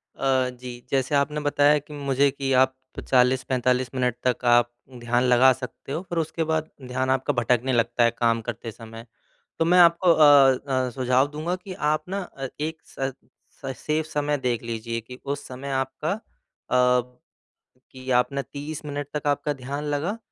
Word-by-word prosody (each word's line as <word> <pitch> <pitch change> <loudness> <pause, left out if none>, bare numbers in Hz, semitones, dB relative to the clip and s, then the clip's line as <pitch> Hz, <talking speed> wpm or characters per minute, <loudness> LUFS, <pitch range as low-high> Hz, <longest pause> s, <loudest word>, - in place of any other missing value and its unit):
अ, 130 -2 +1
जी। 125 -1 -9
जैसे 135 +1 +1
आपने 145 +2 +1
बताया 145 0 +3
कि 150 +1 -13
मुझे 140 -1 +1
कि 135 -1 -3
आप 130 0 -3 0.3
40-45 125 0 +2
मिनट 125 -2 0
तक 125 0 0
आप 120 0 +4 0.3
ध्यान 120 +1 +1
लगा 125 +1 +6
सकते 130 +1 -9
हो 160 - -2
फिर 175 - -3
उसके 160 +1 -2
बाद 160 0 -1 0.2
ध्यान 130 +1 -1
आपका 130 +2 +1
भटकने 125 +1 +1
लगता 120 +1 +2
है 115 - +4
काम 115 -1 +2
करते 115 0 -5
समय। 115 +1 -11 0.5
तो - - +2
मैं 175 +2 +4
आपको 170 0 +6
अ 145 -4 +6
अ, 130 -1 0
सुझाव 130 +2 +2
दूँगा 155 +4 -3
कि 185 0 -9
आप 155 -3 0
ना 195 +2 -2
अ, 135 -6 -7
एक 160 +1 -3
स 135 0 -4 0.5
स 135 -1 -3
सेफ़ 155 +1 -1
समय 150 -1 -1
देख 120 -2 0
लीजिए 115 0 -4
कि 125 +3 -12
उस 140 0 -4
समय 130 +2 -7
आपका 135 +5 -2
अ, 205 - -3 1.7
कि 130 0 -10
आपने 130 +3 +2
30 145 +3 -7
मिनट 145 -1 -4
तक 150 -1 -3
आपका 145 +1 0
ध्यान 140 +2 -5
लगा 150 +8 -2
135 Hz, 175 wpm, -24 LUFS, 125-150 Hz, 1.7 s, लगा